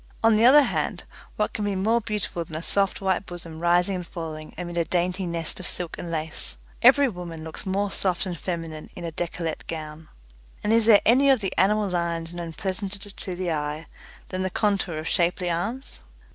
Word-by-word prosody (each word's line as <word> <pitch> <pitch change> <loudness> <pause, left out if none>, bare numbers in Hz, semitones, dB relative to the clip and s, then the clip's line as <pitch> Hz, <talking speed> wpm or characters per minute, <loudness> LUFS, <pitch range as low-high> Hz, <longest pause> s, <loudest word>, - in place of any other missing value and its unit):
On 225 -1 +6
the 220 +2 +5
other 290 +4 +9
hand, - - -1 0.3
what 210 - 0
can 210 - -2
be 205 -1 0
more 220 +5 +2
beautiful 210 -5 -2
than 160 -1 -10
a 160 - -4
soft 200 +1 +1
white 190 0 0
bosom 170 -2 -7
rising 175 +3 +3
and 180 -2 -6
falling 155 -2 -6
amid 175 -1 -5
a 170 - +2
dainty 180 +2 0
nest 170 0 -3
of 185 - -3
silk 175 -2 -4
and 175 - -5
lace? 155 - -3 0.2
Every 285 -1 +7
woman 175 -7 -6
looks 160 +4 -7
more 200 +1 0
soft 185 -2 +1
and 180 -2 -3
feminine 165 -2 -5
in 175 - -7
a 165 - -3
decollete 165 -1 -4
gown. 155 -1 -6 0.5
And 210 - +2
is 230 -1 +4
there 210 -3 +8
any 265 +5 +6
of 265 -3 +5
the 195 -2 -2
animal 210 +2 +3
lines 170 -2 -2
known 170 -1 -5
pleasanter 195 +4 -3
to 185 -1 -6
the 180 -1 -2
eye 150 +1 -2 0.4
than 185 0 -3
the 190 - 0
contour 195 -4 0
of 155 +1 -4
shapely 175 +1 +1
arms? 225 +11 -3
180 Hz, 200 wpm, -25 LUFS, 165-200 Hz, 0.5 s, other